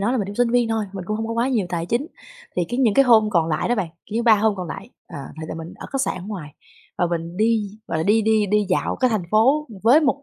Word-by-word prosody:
nói 215 +5 +1
là 260 - 0
mình 200 - -1
cũng 200 - -7
sinh 245 0 +1
viên 240 -1 +2
thôi, 220 -1 0
mình 190 -2 -6
cũng 215 +3 -2
hông 225 0 -3
có 230 - -3
quá 235 +3 0
nhiều 220 -8 0
tài 170 -1 -2
chính, 245 - -1 0.5
thì 180 - +2
cái 245 - -3
những 230 -6 +3
cái 275 - +5
hôm 220 -3 +5
còn 165 -4 +2
lại 155 +6 -1
đó 245 - +2
bạn, 195 -6 -2 0.2
kiểu 215 - -9
như 235 - +1
3 230 -2 +6
hôm 215 0 +2
còn 180 -2 -5
lại, 195 +8 -7 0.2
ờ, 145 - -8 0.2
thì 155 - -6
là - - -5
mình 165 +1 -8
ở - - -9
khách 270 - 0
sạn - - -1
ở 180 - -9
ngoài 170 -9 -7 0.4
và 175 - +2
mình 170 0 -4
đi, 215 -2 +1 0.2
gọi 160 - -1
là, 160 - -1
đi 220 +2 +3
đi 215 -1 +2
đi 210 0 +1
dạo 180 - 0
cái 255 -2 +2
thành 215 -5 0
phố 270 +8 +3 0.2
với 250 +8 +6
một 280 -2 0
215 Hz, 310 wpm, -22 LUFS, 180-235 Hz, 0.5 s, 3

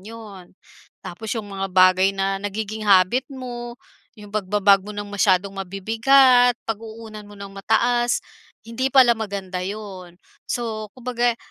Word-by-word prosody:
'yon. 205 -4 -12 0.5
Tapos 215 +5 -8
'yong 225 - -4
mga 195 0 -3
bagay 185 +1 +5
na 195 0 -1
nagiging 215 +1 -5
habit 195 +7 +4
mo, 240 -3 -7 0.4
'yong 205 -1 -13
pagba-bag 200 -1 +3
mo 210 - -7
ng 205 0 -6
masyadong 200 -1 +1
mabibigat, 235 +6 +3
pag-uunan 220 -1 -7
mo 205 - -14
nang 200 0 -9
mataas, 240 +4 +1 0.4
hindi 230 +4 -2
pala 260 -3 +6
maganda 200 -5 -5
'yon. 190 -2 -7 0.3
So, 220 -3 -3
kumbaga, 245 -1 -1
210 Hz, 130 wpm, -22 LUFS, 195-235 Hz, 0.5 s, pala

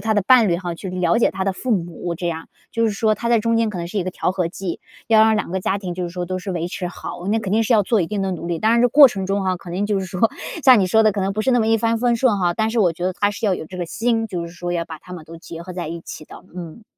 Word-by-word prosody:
他 220 - +2
的 205 - +2
伴 240 -5 +6
侣 170 - +2
哈 175 -1 -4
去 190 - -7
了 185 +4 +1
解 235 - +3
他 190 0 -3
的 195 - 0
父 250 +6 -5
母， 175 -3 -2
这 175 +1 -4
样。 165 -1 -4 0.2
就 230 0 +1
是 - - +1
说 215 +1 +1
他 235 - -4
在 235 -1 +4
中 230 +1 +1
间 225 -1 +2
可 195 - -7
能 170 - -4
是 200 +4 -3
一 180 - -1
个 185 - -2
调 180 - -1
和 180 -3 -1
剂， 180 -1 -5 0.3
要 220 -1 +5
让 220 0 +4
两 215 - -3
个 190 +1 -2
家 190 - 0
庭 185 -3 -5
就 180 0 -3
是 175 - -3
说 180 0 -4
都 185 +1 -3
是 190 +2 -6
维 170 -1 -2
持 180 0 -4
好， 175 0 -8
那 220 +2 +2
肯 200 -3 -4
定 225 +2 +3
是 230 - +1
要 210 - +4
做 215 +2 +1
一 170 - 0
定 200 +2 -2
的 190 - -1
努 170 -1 -6
力。 170 -2 -2
当 220 +1 +2
然 235 - +4
这 245 - +4
过 285 +4 +9
程 195 -4 -4
中 200 +1 0
哈 185 -1 0
肯 175 -1 -10
定 200 +2 -1
就 205 -2 0
是 190 - -4
说， 185 +4 +1 0.3
像 255 -5 +8
你 185 - +2
说 220 +5 +4
的 215 -2 +4
可 200 - -3
能 195 +1 0
不 215 - -1
是 265 - +1
那 245 -2 +3
么 220 - +1
一 225 0 +4
帆 230 0 0
风 240 0 +2
顺 230 -4 +2
哈， 175 -2 +1
但 220 +3 0
是 235 - -1
我 180 -6 +3
觉 175 +2 -6
得 185 - 0
他 205 +3 +1
是 205 +3 -6
要 200 -3 +3
有 160 - -7
这 185 - -10
个 175 - -2
心， 225 +5 -1
就 175 -5 -4
是 170 - -11
说 175 0 -4
要 170 -1 -1
把 160 -2 -8
他 180 - -13
们 165 -3 -8
都 165 +1 -10
结 165 0 -10
合 180 +1 -8
在 175 -3 -5
一 170 +1 -6
起 155 - -9
的， - - -13
嗯。 175 +4 -8
190 Hz, 380 characters per minute, -21 LUFS, 175-220 Hz, 0.3 s, 过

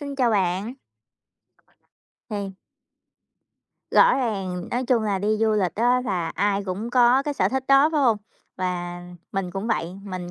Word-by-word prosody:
xin 280 -1 -6
chào 250 -4 +2
bạn. 195 +3 0 1.6
Thì 200 -2 -5 1.3
Rõ - - +6
ràng, 195 -8 -3
nói 250 +2 -1
chung 245 -3 +2
là, 205 -3 0
đi 205 +2 -2
du 220 -1 +3
lịch 190 -6 0
á 245 +3 +2
là 180 -7 -1
ai 200 -1 0
cũng 200 +5 -4
có 250 +1 +4
cái 290 0 -3
sở - - +2
thích 265 0 -2
đó, 275 +2 +6
phải 305 - +2
hông? 235 -5 +4 0.4
Và 175 -1 -3 0.3
mình 195 -2 -2
cũng 195 +4 -4
vậy, 180 -7 -1
mình 185 -3 -6
210 Hz, 165 wpm, -24 LUFS, 185-250 Hz, 1.6 s, Rõ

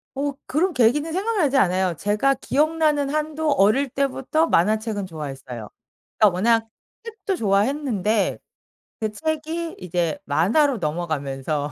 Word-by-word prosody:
어 280 +1 -1
그런 345 +6 0
계기는 290 +6 +2
생각나지 380 -8 0
않아요. 185 -5 +2
제가 210 +9 +2
기억나는 300 +1 +1
한도 305 +1 -1
어릴 240 +5 +3
때부터 275 +4 0
만화책은 215 - +1
좋아했어요. 135 - -7 0.5
그러니까 210 -4 +5
워낙 225 +3 +2 0.4
책도 420 -4 -4
좋아했는데 215 - +1 0.6
그 215 -1 -1
책이 315 +6 -3
이제 175 -2 -1
만화로 240 - +2
넘어가면서 150 -3 -2
230 Hz, 310 characters per minute, -23 LUFS, 185-305 Hz, 0.6 s, 그러니까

